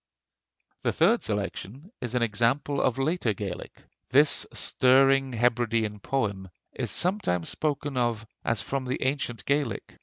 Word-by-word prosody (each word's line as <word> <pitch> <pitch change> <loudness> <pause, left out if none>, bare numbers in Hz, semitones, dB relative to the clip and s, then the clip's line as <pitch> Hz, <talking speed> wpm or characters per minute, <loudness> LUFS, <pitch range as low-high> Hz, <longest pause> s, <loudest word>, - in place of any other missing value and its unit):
The - - 0
third 210 +9 +3
selection 105 - -4
is 125 0 -3
an 125 - +2
example 120 +6 +1
of 125 - +1
later 135 -4 0
Gaelic. 95 -3 -7 0.3
This 145 +3 +4
stirring 135 0 +3
Hebridean 115 -2 +1
poem 100 -6 -2 0.2
is - - -3
sometimes 180 - 0
spoken 145 -2 -2
of 120 -3 0 0.2
as 115 -3 0
from 135 -1 -3
the 130 +1 -2
ancient 130 -5 -2
Gaelic. 140 -3 -2
125 Hz, 130 wpm, -27 LUFS, 110-140 Hz, 0.3 s, This